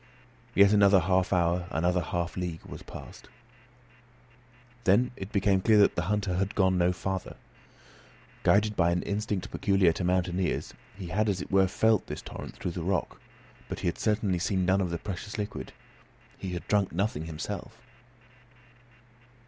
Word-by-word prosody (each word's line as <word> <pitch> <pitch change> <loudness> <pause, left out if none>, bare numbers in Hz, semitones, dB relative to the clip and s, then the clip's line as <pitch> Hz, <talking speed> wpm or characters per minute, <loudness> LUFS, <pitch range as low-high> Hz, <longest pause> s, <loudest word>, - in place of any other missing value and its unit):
Yet 100 +1 +6
another 100 -1 +6
half 90 +2 +1
hour, 90 -1 +1
another 90 +2 +1
half 85 +1 -3
league 90 -3 -4
was - - -9
passed. - - -11 1.5
Then 110 +6 +3
it 95 -1 -8
became 100 -1 +2
clear 110 +2 +4
that 100 - +5
the 85 - 0
hunter 100 -4 0
had 100 +3 -1
gone 95 -2 +3
no 90 0 +3
farther. 95 0 -4 1.0
Guided 105 +1 +3
by 85 -2 +3
an 85 +1 0
instinct 100 -2 -3
peculiar 95 -3 +3
to 90 - -4
mountaineers 90 0 0 0.2
he 95 -4 -7
had 105 +5 +1
as 95 -2 0
it - - -7
were 95 -1 +4
felt 110 +1 +2
this - - -6
torrent - - -8
through 90 - -3
the 85 - -5
rock; 90 0 -2 0.5
but - - -5
he - - -1
had 85 - -2
certainly 105 -4 +1
seen 95 +1 0
none 95 +2 +3
of 90 - -1
the 85 - -2
precious 100 +3 -6
liquid; 105 0 -5 0.6
he 95 -2 -6
had 90 - -6
drunk 100 -2 +2
nothing 85 -4 -1
himself. 80 -1 -6
95 Hz, 165 wpm, -28 LUFS, 90-100 Hz, 1.5 s, Yet